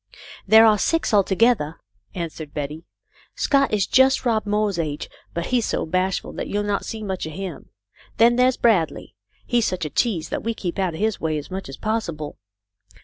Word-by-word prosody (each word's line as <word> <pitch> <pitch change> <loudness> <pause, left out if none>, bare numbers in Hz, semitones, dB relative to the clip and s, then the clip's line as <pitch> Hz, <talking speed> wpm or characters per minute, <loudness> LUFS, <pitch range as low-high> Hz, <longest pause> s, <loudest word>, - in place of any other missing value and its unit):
" - - -16
There 220 +1 +10
are 215 -2 +5
six, 330 -2 0
altogether," 200 -5 +2 0.4
answered 160 -3 -6
Betty. 150 +3 -5 0.5
"Scott 275 -1 +2
is 205 -3 +2
just 265 +1 +4
Rob 220 -3 +1
Moore's 205 -3 0
age, 150 -3 -3 0.3
but 170 0 -2
he 250 - +1
is 230 - -2
so - - -1
bashful 185 +3 -1
that - - -4
you'll 205 0 -1
not 205 -1 -1
see 220 -1 -6
much 190 -5 -3
of 155 - -7
him. 185 -5 -7 0.5
Then 235 +1 +5
there's 250 +1 +3
Bradley. 205 -9 +1 0.3
He 240 - +2
is 230 - +1
such 180 -3 -2
a 150 - -5
tease 175 -10 0
that - - -3
we 230 0 -2
keep 180 -1 -4
out 185 -4 0
of - - -7
his 220 -1 0
way 155 -1 0
as 150 +4 -7
much 190 -5 -5
as 135 - -8
possible. 170 -9 -3
195 Hz, 205 wpm, -23 LUFS, 165-225 Hz, 0.5 s, There